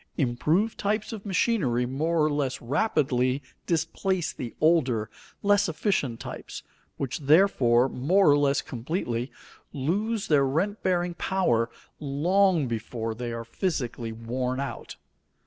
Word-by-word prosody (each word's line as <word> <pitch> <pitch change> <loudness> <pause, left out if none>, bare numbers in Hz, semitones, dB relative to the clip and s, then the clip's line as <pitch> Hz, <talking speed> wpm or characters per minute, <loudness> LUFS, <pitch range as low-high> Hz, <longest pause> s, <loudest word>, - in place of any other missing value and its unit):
Improved 155 - +1
types 215 +2 -1
of 210 -2 -7
machinery 175 - +1
more 155 +5 0
or - - +2
less 140 -3 -1
rapidly 130 - +1 0.2
displace 170 +2 -1
the 120 - -7
older, 130 -10 +2 0.3
less 205 -3 +3
efficient 155 - -1
types, - - -8 0.3
which, 135 +1 -3
therefore, 135 -6 +4
more 150 +7 +3
or 145 - +5
less 140 0 +2
completely 125 -2 -3 0.4
lose 205 +10 -1
their 140 -3 +4
rent 190 +10 -1
bearing 175 -1 0
power 170 -12 +1 0.3
long 165 +3 +2
before 115 0 -3
they 120 +1 -5
are 115 0 -5
physically 120 - -3
worn 125 +3 -3
out. 140 - -5
145 Hz, 125 wpm, -26 LUFS, 125-185 Hz, 0.4 s, or